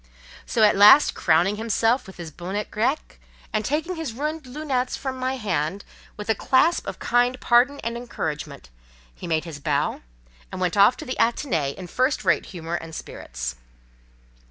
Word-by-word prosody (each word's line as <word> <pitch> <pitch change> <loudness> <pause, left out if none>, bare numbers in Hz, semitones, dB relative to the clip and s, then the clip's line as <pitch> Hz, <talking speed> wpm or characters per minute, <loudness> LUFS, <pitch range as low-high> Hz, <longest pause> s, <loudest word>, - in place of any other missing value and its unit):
So, 225 - +1
at 210 - +5
last, 210 +9 +7
crowning 175 +5 +2
himself 225 +2 +1
with 190 - -12
his 165 -2 -7
bonnet 190 +6 -5
grec, 255 +8 -2 0.3
and 215 0 0
taking 315 - -2
his 315 -8 -4
ruined 300 +3 -4
"lunettes" 260 -2 -2
from 265 -1 -4
my 260 +1 -1
hand 195 - -2 0.3
with 210 - -7
a 220 - +3
clasp 265 +10 +2
of - - -5
kind 245 +1 +1
pardon 255 +4 +3
and 230 +1 -3
encouragement, 160 - -5 0.4
he - - -9
made 160 0 0
his 160 -4 -8
bow, 145 0 -1 0.5
and - - -6
went 180 0 0
off 205 +4 +5
to - - -8
the 255 - -4
Athénée 170 - 0
in 185 - -8
first 255 - 0
rate - - +2
humour 170 -2 -7
and 165 -2 -5
spirits. - - -6
215 Hz, 170 wpm, -24 LUFS, 170-255 Hz, 0.5 s, last